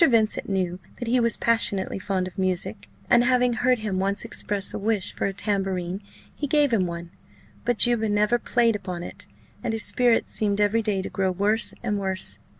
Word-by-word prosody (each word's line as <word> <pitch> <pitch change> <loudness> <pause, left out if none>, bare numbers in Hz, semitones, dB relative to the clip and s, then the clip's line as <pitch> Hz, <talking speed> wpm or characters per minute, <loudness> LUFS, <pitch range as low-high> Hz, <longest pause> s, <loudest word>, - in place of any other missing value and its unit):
Vincent 230 -10 +2
knew 185 -2 -1 0.2
that 240 - -6
he 250 +2 +2
was 235 -2 +3
passionately 205 -5 0
fond 190 -1 -2
of 185 - -11
music; 175 - -2 0.2
and 240 0 +5
having 250 -1 +2
heard 250 +2 +2
him 210 -4 -3
once 200 +2 -1
express 200 -2 0
a - - -4
wish 210 -1 0
for - - -2
a - - -2
tambourine, 195 -2 -2 0.3
he 290 - -4
gave 290 -2 +2
him 190 -5 +2
one: 170 0 -7 0.5
but 245 -1 +1
Juba 235 -2 +3
never 210 +3 +2
played 235 -1 +2
upon 185 -4 -5
it, - - -5 0.4
and 225 - -1
his 225 -1 +6
spirits 245 -2 +3
seemed 205 -1 +1
every 210 +2 +2
day 205 -3 -1
to - - -5
grow 190 -1 0
worse 205 +5 +1
and 210 -4 -1
worse. 190 -1 -1
205 Hz, 195 wpm, -24 LUFS, 190-230 Hz, 0.5 s, his